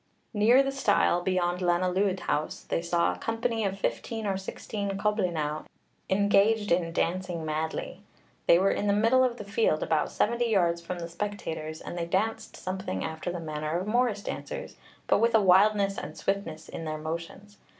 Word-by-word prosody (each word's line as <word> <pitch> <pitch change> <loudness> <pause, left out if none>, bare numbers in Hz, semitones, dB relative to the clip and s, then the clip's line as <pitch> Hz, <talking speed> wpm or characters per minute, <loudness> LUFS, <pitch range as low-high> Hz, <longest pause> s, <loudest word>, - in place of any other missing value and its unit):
Near 230 +6 +5
the 270 - -1
stile 265 -9 +2
beyond 180 -1 0
Lanelwyd 185 +2 +1
House 150 - -2
they - - -2
saw 170 0 +1
a - - -10
company 225 0 -1
of 195 0 -2
fifteen 225 +2 -3
or 195 -1 0
sixteen 195 +1 -4
coblynau 175 -8 -1 0.4
engaged 205 +2 +3
in 170 -1 +2
dancing 175 -1 -1
madly. 155 +1 -3 0.5
They 170 - +7
were 195 +2 +3
in 205 - -1
the 200 - +4
middle 230 +5 +4
of 245 -2 0
the 210 - -6
field, 200 -6 +1
about 155 -2 +1
seventy 235 +2 +1
yards 170 -5 +2
from 180 +1 -5
the 170 -1 -5
spectators, 165 -4 -5
and - - -7
they 170 -1 -3
danced 210 +6 -1
something 185 - -4
after 160 +2 -4
the 175 - -4
manner 155 0 -3
of 185 - -4
Morris 220 -2 +1
dancers, - - -6 0.3
but - - +3
with 230 +1 +3
a - - +7
wildness 200 +1 +4
and - - -8
swiftness 180 -6 -3
in 165 - -6
their 155 0 -3
motions. 170 +6 -6
190 Hz, 175 wpm, -28 LUFS, 170-210 Hz, 0.5 s, They